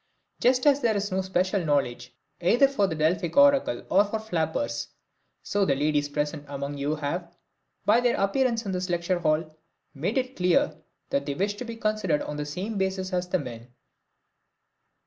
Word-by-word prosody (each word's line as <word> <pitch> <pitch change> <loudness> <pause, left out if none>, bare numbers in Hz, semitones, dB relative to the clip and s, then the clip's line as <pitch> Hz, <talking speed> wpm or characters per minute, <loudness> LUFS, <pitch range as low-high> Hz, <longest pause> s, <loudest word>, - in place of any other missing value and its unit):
Just 250 +1 +3
as 285 -1 +5
there 225 -4 +2
is 200 0 -2
no 190 +1 +1
special 185 +1 0
knowledge 130 -5 0 0.3
either 240 +10 +5
for 235 -8 +1
the 160 - -3
Delphic 165 +2 0
oracle 280 - +4
or 195 +2 +6
for 210 +2 -3
flappers, 160 - -2 0.6
so 205 0 0
the 140 -7 +2
ladies 145 +1 +1
present 145 +1 -2
among 140 0 -5
you 145 +2 0
have, 170 +4 -4 0.5
by 215 +3 +5
their 245 -1 +2
appearance 230 +3 +1
in 195 - -2
this 185 0 -2
lecture 175 +1 0
hall, 155 -1 0 0.4
made 170 - -2
it 255 0 -1
clear 180 -3 +2 0.4
that 140 +1 0
they 140 - -2
wish 200 +5 0
to 250 - -5
be 230 -1 -6
considered 215 -8 0
on 150 - -5
the 150 0 -3
same 195 +8 -4
basis 190 0 -2
as 180 0 -1
the 185 - +2
men. 120 -4 -9
180 Hz, 180 wpm, -26 LUFS, 150-210 Hz, 0.6 s, or